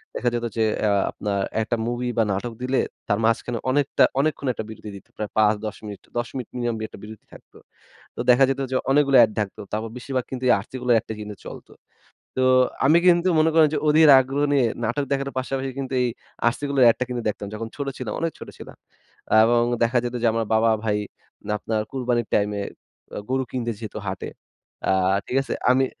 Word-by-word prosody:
দেখা 120 - +1
যেত 120 0 -1
যে 110 - +3 0.2
আ - - +3 0.2
আপনার 100 -2 -3 0.2
একটা 115 +2 -1
movie 120 +1 -2
বা 115 - +4
নাটক 115 +5 -3
দিলে 130 +1 0 0.3
তার 105 -1 +1
মাঝখানে 115 +1 0
অনেকটা 140 +1 +2 0.2
অনেকক্ষণ 145 -1 0
একটা 110 - -5
বিরতি 110 -1 -9
দিত। 100 - -12
প্রায় 105 -1 -3
৫ 105 0 +2
মিনিট, 100 -2 -8 0.2
১০ 120 - -1
মিনিট 125 -3 -5
minimum 120 -1 -1
একটা - - -13
বিরতি 110 0 -11
থাকত। - - -16 0.6
তো - - -5
দেখা 125 +2 +6
যেত 135 0 -2
যে 130 - 0
অনেকগুলা 140 -2 +5
এড 110 - -1
থাকতো। 100 -2 -4
তারপর 110 +2 -2
বেশিরভাগ 130 0 -3
কিন্তু 130 -1 -5
এই - - +7
RC - - -21
Cola 125 -1 +1
এর - - +6
এডটা 110 - -7
কিন্তু 105 -1 -7
চলতো। - - -10 0.7
তো 130 - +3 0.4
আমি 155 +4 +6
কিন্তু 175 +1 +4
মনে 160 +1 +4
করেন 160 -1 +6
যে - - +1
অধির 155 0 +6
আগ্রহ 135 +2 -1
নিয়ে 135 -4 +4 0.2
নাটক 120 +6 -1
দেখার 140 0 0
পাশাপাশি 135 +1 -2
কিন্তু 135 -1 -4
এই 125 - +2 0.4
RC - - -10
Cola 140 -1 0
এর - - +8
এডটা 120 - -3
কিন্তু 120 -1 -3
দেখতাম। 100 0 -5
যখন 110 +1 -5
ছোট 140 -1 -4
ছিলাম, 120 -5 -4
অনেক 165 -1 0
ছোট - - -9
ছিলাম। - - -11 0.7
এবং 120 +1 +3 0.2
দেখা 120 +2 +2
যেত 120 0 -3
যে - - +4
আমার 115 0 0
বাবা 110 +1 +4
ভাই 105 -2 +1 0.6
আপনার 110 +1 -2
কুরবানির 125 -3 -1
টাইমে 105 0 +1 0.6
আ - - -2
গরু 130 0 +1
কিনতে 120 -2 -2
যেত 110 - -7
হাটে। 95 -1 -4 0.6
আ - - +3 0.3
ঠিক 130 - -1
আছে? 135 - -4 0.2
আমি 130 +1 +3
120 Hz, 205 wpm, -23 LUFS, 110-135 Hz, 0.7 s, এর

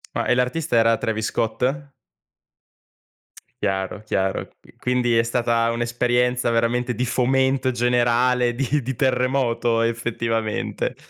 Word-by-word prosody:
Ma, - - -1
ehm, 125 - +3
l'artista 125 +4 -1
era 115 0 +4
Travis 110 0 -2
Scott? 135 +5 -2 1.7
Chiaro, 95 +1 -2
chiaro. 95 0 -1
Qui - - -21
quindi 125 -2 +1
è 115 - +5
stata 115 0 0
un'esperienza 120 +1 0
veramente 120 +1 0
di 125 +3 -1
fomento 130 +1 +1
generale, 120 0 +2
di 140 +2 0
di 130 +1 -4
terremoto 125 -2 +1
effettivamente. 115 -1 -2
120 Hz, 115 wpm, -22 LUFS, 115-125 Hz, 1.7 s, è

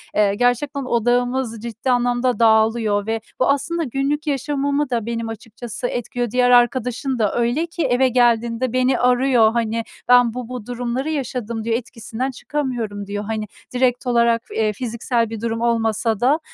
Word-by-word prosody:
eee, 205 -1 +3
gerçekten 250 +5 0
odağımız 245 -1 0
ciddi 235 +2 -3
anlamda 245 -1 +1
dağılıyor. 220 -2 +3
Ve 225 0 -1 0.2
bu 255 - +2
aslında 330 +5 0
günlük 280 +3 -2
yaşamımı 285 0 0
da 235 -4 -1
benim 230 -1 -3
açıkçası 225 +1 -6
etkiliyor. 245 -1 -3
Diğer 250 +1 +3
arkadaşın 250 +1 +2
da 210 -3 +1
öyle 240 +7 +1
ki 335 0 -4
eve 255 0 +3
geldiğinde 240 0 +2
beni 255 +1 +2
arıyor, 250 -2 +4
hani, 230 -1 -1 0.2
"Ben 245 -2 +5
bu 250 -1 -5
bu 250 -4 -6
durumları 245 +4 -3
yaşadım." 245 -6 -3
diyor 225 0 0
"Etkisinden 240 +1 -4
çıkamıyorum." 240 -7 -4
diyor. 205 +1 -4
Hani, 215 0 -3 0.3
direkt 250 0 +1
olarak, 235 -1 +3
eee, 215 -1 0
fiziksel 235 0 -1
bir 225 -1 -6
durum 230 0 -2
olmasa 225 -2 +1
da, 270 +6 +3
240 Hz, 155 wpm, -21 LUFS, 225-255 Hz, 0.3 s, Ben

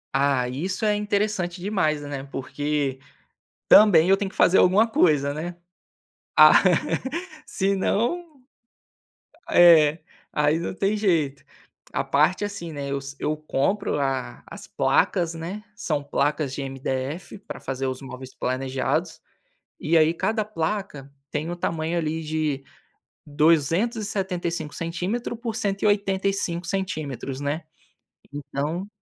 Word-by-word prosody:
Ah, 135 -3 +2
isso 180 - -3
é 210 - +3
interessante 205 -4 -1
demais, 155 -7 0
né, 140 -2 -5
porque 140 0 -2 0.7
também 185 -5 +7
eu 195 - +5
tenho 200 -2 -2
que - - -18
fazer 180 - +5
alguma 195 +5 +5
coisa, 150 -10 +2
né. 170 +4 -5 0.8
Ah, - - +9 0.9
senão 240 - -1 1.1
é 160 -3 +7 0.3
aí 150 +1 +2
não 170 - -4
tem 195 +2 0
jeito 160 -9 0 0.5
a - - -1
parte, 155 +8 +2
assim, 200 -5 -5
né, 140 -2 -5
eu 140 - 0 0.2
eu 155 0 -1
compro 155 +4 -1
a 135 -2 -2
as - - -10
placas, 170 -2 +1
né, 180 +6 -6
são 155 -9 -2
placas 145 0 0
de 140 - -4
MDF, 135 +7 -4
para - - -9
fazer 135 0 -4
os 130 +1 -4
móveis 130 -1 -9
planejados 130 +1 -2 0.6
e 165 - 0
aí 155 +1 +5
cada 220 +5 0
placa, 165 -7 -4 0.2
tem 155 +3 -2
o 175 - -3
tamanho 165 0 -2
ali 160 0 -2
de 155 -3 -2 0.6
275 170 - 0
centímetro 180 +9 -3
por 230 -2 -4
185 195 -4 0
centímetros, 155 - -3
né, 145 +3 -2 0.7
então, 145 +6 -4
165 Hz, 120 wpm, -24 LUFS, 145-195 Hz, 1.1 s, Ah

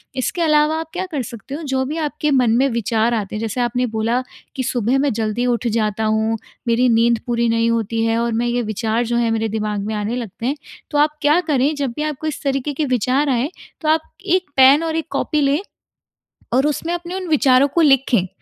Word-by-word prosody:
इसके 265 +6 -2
अलावा 305 0 +3
आप 325 -1 -6
क्या 370 +1 -2
कर 290 -4 -1
सकते 235 +3 -8
हो, 320 - -6
जो 265 -2 -1
भी 300 +5 -4
आपके 300 -1 -1
मन 250 -4 +3
में 270 +2 +3
विचार 230 0 0
आते 215 -3 -3
हैं 210 - -3
जैसे 225 +2 -2
आपने 245 +1 0
बोला 230 +3 +1 0.3
कि 260 - -2
सुबह 245 0 0
मैं 280 -2 +1
जल्दी 220 +2 -1
उठ 245 -1 0
जाता 220 -1 0
हूँ, 220 +1 +1 0.3
मेरी 235 +2 +3
नींद 230 0 +3
पूरी 235 -1 +1
नहीं 230 0 +2
होती 225 0 -1
है 225 0 +1
और 235 0 0
मैं 235 +2 0
ये 240 +1 0
विचार 220 +2 -1
जो 235 +1 -1
हैं 235 -1 +1
मेरे 225 0 0
दिमाग 210 -1 -2
में 220 - -2
आने 210 +3 -2
लगते 230 -2 -6
हैं। 275 +3 0 0.4
तो 295 - 0
आप 295 +1 +4
क्या 295 +4 +4
करें 295 -3 +1
जब 280 -3 -2
भी 300 - -2
आपको 305 0 -3
इस 305 - -4
तरीके 275 +1 -1
के 300 +2 -1
विचार 255 +3 +1
आए 255 +2 +1 0.3
तो 310 - 0
आप 315 0 +1 0.2
1 365 -3 +1
पेन 270 +4 +6
और 325 -1 -2
1 325 0 -2
कॉपी 305 - 0
लें 280 +1 +2 0.9
और 265 +3 +3
उसमें 325 +3 -2
अपने 350 0 -5
उन 375 -1 -4
विचारों 275 -3 +4
को 340 - +3
लिखें। 270 - +3
250 Hz, 230 wpm, -19 LUFS, 230-295 Hz, 0.9 s, पेन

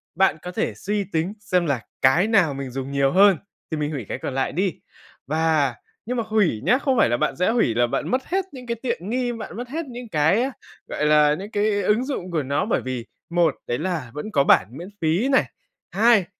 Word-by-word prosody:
bạn 190 -3 +3
có 180 - -6
thể - - -1
suy 205 +1 -2
tính 175 0 -2
xem 185 -4 0
là 140 -6 0 0.2
cái 160 +10 +4
nào 195 -10 +3
mình 135 -1 -5
dùng 135 +1 -5
nhiều 140 -1 +2
hơn 195 -1 +6 0.3
thì 160 - -1
mình 150 0 -2
hủy 135 -8 -4
cái - - -3
còn 135 - -4
lại 135 0 0
đi, 185 +2 -1 0.5
và 155 -4 +1 0.3
nhưng 250 +3 -2
mà 230 - 0
hủy 200 - +1
nhá, 240 - +4
không 270 -2 0
phải - - +4
là 120 - +1
bạn - - 0
sẽ 180 - +1
hủy 225 - +2
là 120 +1 +3
bạn - - -2
mất 255 +1 0
hết 380 +1 -1
những 255 -3 -10
cái 235 - -1
tiện 195 -7 -3
nghi, 245 +1 0
bạn 225 -2 -7
mất 245 +1 -6
hết 320 +4 -3
những 245 -3 -9
cái, 180 - +2 0.4
gọi 150 - -2
là, 150 0 +5
những 200 +6 -8
cái 205 -1 +1
ứng 220 +5 +2
dụng 220 -10 -4
của 160 -3 0
nó, 140 +6 0
bởi 225 - 0
vì 130 -2 -4 0.2
một, 170 -3 +2
đấy 120 - -1
là 160 -8 -3
vẫn 150 +9 -6
có 140 -6 +3
bản 95 - +5
miễn 175 +4 -8
phí 165 +10 +2
này, 270 - +4 0.5
hai, 220 -2 +4
180 Hz, 235 wpm, -23 LUFS, 145-220 Hz, 0.5 s, hơn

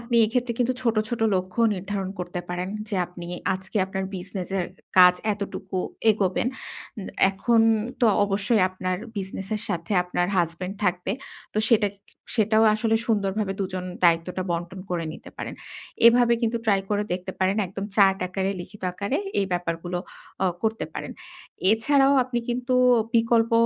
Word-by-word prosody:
আপনি 235 0 -1
এক্ষেত্রে 240 +2 0
কিন্তু 245 +1 +2
ছোট, 230 -3 +1
ছোট 240 -1 -3
লক্ষ্য 185 +4 -2
নির্ধারণ 195 0 -3
করতে 175 0 -4
পারেন, 180 +1 -3 0.2
যে 205 - -1
আপনি 180 -1 -9 0.3
আজকে 190 +3 -6
আপনার 190 0 -3
বিজনেস 185 0 -6
এর 175 - -2 0.3
কাজ 180 0 +9 0.2
এতটুকু 195 -2 -5 0.3
এগোবেন। 200 +2 +1 0.5
উম 195 - -6 0.2
এখন 225 +4 +2 0.4
তো 240 - +5 0.2
অবশ্যই 200 +1 +1
আপনার 185 0 -3 0.2
বিজনেস 195 0 -5
এর 210 - -5
সাথে 170 +3 -3
আপনার 180 0 -1
হাসব্যান্ড 180 +3 -1
থাকবে। 180 +1 0 0.4
তো - - +1
সেটা 210 -4 +4 0.5
সেটাও 220 0 +4
আসলে 225 +1 +1
সুন্দরভাবে 205 -2 0
২ - - +1
জন 180 - -3 0.2
দায়িত্বটা 170 +2 +2
বন্টন 175 +2 -3
করে 170 -2 -1
নিতে 255 - -11
পারেন। - - -5 0.5
এভাবে 240 0 +6
কিন্তু 235 0 +1
ট্রাই 200 -3 +4
করে 205 0 +1
দেখতে 180 +1 -3
পারেন। 190 +2 +2
একদম 195 +2 -6
চার্ট 195 -2 +5
আকারে 190 +1 -1
লিখিত 205 +3 -11
আকারে 200 - -2 0.2
এই 195 - +1
ব্যাপারগুলো 175 0 -2 0.5
অ - - +4 0.2
করতে 220 0 0
পারেন। - - -5 0.6
এছাড়াও 270 +5 +4
আপনি 245 -1 -2
কিন্তু 250 +1 -1 0.4
বিকল্প 230 0 +3
195 Hz, 155 wpm, -25 LUFS, 180-225 Hz, 0.6 s, কাজ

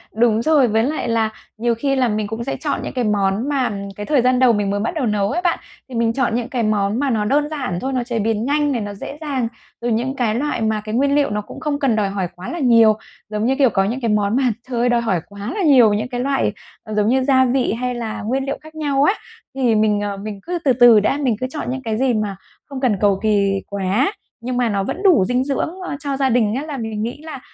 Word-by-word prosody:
Đúng 225 -1 +3
rồi, 290 -1 +4
với 220 0 +2
lại 300 +5 -2
là 225 -1 +1 0.3
nhiều 235 +1 +1
khi 275 +4 0
là 260 -2 +2
mình 215 -1 -1
cũng 225 +2 -4
sẽ 270 - -3
chọn 290 -3 -2
những - - -5
cái 255 -2 -1
món 205 +3 0
mà 270 -5 0 0.2
cái 205 - -6
thời 285 0 +3
gian 250 +1 +3
đầu 255 -2 +5
mình 205 -2 0
mới 200 +1 -1
bắt 220 - -2
đầu 295 -5 0
nấu 210 -2 0
ấy 350 - -1
bạn. 350 -2 +1 0.3
Thì 255 - -8
mình 230 0 +1
chọn 245 -3 0
những 240 -1 -2
cái 245 -3 -1
món 210 +1 +1
mà 285 0 +1
nó 220 -4 0
đơn 290 +6 +1
giản 260 - -3
thôi, 270 +1 -2
nó 250 -2 0
chế 240 -2 -3
biến 220 +1 0
nhanh 290 +1 +1
này, 240 -4 -1
nó 205 0 -5
dễ 240 +8 -8
dàng, 270 -6 -1 0.3
rồi 240 0 -1
những 245 +4 -1
cái 230 -5 0
loại 285 0 -1
mà 220 -1 0
cái 215 +1 -5
nguyên 280 +3 +2
liệu 290 -1 +2
nó 210 0 -2
cũng 210 - -11
không 295 -2 -2
cần 270 -6 +2
đòi 205 -2 +1
hỏi 195 -2 -2
quá 180 +1 -8
là 340 - -4
nhiều. 230 -5 +5 0.4
Giống 210 0 -2
như, 265 +2 +2
kiểu, 270 -2 +4
có 195 -2 +1
những 235 +7 -2
cái 230 - 0
món 210 0 +1
mà 270 - +2 0.3
trời 240 -2 -2
ơi, 245 +1 +2
đòi 240 -1 +2
hỏi 190 -7 0
quá 200 0 -6
là 400 - 0
nhiều 255 -9 +6
những 210 +3 -1
cái 245 -1 -3
loại, 275 +1 +1 0.4
giống 210 0 +1
như, 260 +3 +2
gia 260 -1 +4
vị 255 -3 +1
hay 250 +2 -2
là 230 -2 -4
nguyên 260 +6 -1
liệu 275 - -3
khác 315 +1 -14
nhau 285 -3 +1
á, 345 - +4 0.4
thì 250 -4 +2
mình, 210 -1 +2
ờ, 205 -1 -3
mình 205 0 -6
cứ 355 0 -3
từ 265 - +5
từ 240 -2 +7
đã, 215 +7 +1
mình 265 -6 +1
cứ 255 - -2
chọn 300 +3 -5
những 265 +1 -3
cái 220 -2 -2
gì 260 0 +2
mà 210 -3 -1 0.3
không 275 -2 -7
cần 240 -7 +2
cầu 200 -2 +3
kì 200 -2 +2
quá, 200 - 0 0.3
nhưng 245 +1 -3
mà 245 -2 +2
nó 200 -2 0
vẫn 365 - -4
đủ 355 - +5
dinh 250 +5 +1
dưỡng 275 +2 -1 0.3
cho 280 -2 -3
gia 270 -1 +2
đình 230 -3 +2
á 270 - -2
là 300 -3 -5
mình 220 -3 -3
nghĩ 240 +6 -5
là 315 -4 -7
240 Hz, 275 wpm, -20 LUFS, 215-270 Hz, 0.4 s, từ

